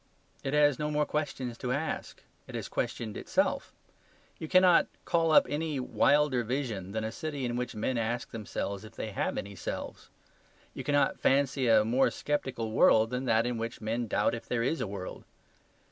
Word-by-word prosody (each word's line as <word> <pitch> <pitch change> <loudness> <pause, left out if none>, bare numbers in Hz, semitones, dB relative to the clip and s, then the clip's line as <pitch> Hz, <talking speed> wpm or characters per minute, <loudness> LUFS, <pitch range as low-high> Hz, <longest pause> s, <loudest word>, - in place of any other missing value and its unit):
It 135 +2 -1
has 145 -2 +4
no 150 0 -1
more 150 0 +1
questions 130 -6 -3
to 125 - -2
ask; 145 +5 -3 0.2
it - - -8
has - - -4
questioned 110 -3 -3
itself. - - 0 0.7
You 160 - -5
cannot 185 0 +5 0.2
call 165 -1 +2
up - - +7
any 150 +1 -2
wilder 145 0 +3
vision 115 -6 -3
than 110 +1 -2
a 110 - -2
city 145 0 -4
in 120 0 -2
which 125 -1 -3
men 115 +3 -1
ask 115 +1 -2
themselves 100 -2 -4
if 110 +1 -12
they 110 - -4
have - - -2
any 100 +1 -5
selves. - - -6 0.6
You - - -6
cannot 145 -1 +2
fancy 135 -1 +2
a 110 -2 +5
more 125 +4 +3
sceptical 130 -6 -2
world 110 +1 +5
than 125 +1 -2
that 115 -1 +3
in 120 -1 -2
which 115 0 -4
men 115 +2 -2
doubt 105 - +1
if 115 - -6
there 115 -1 0
is 145 +4 0
a 115 - -1
world. 95 -2 -7
125 Hz, 185 wpm, -30 LUFS, 110-145 Hz, 0.7 s, up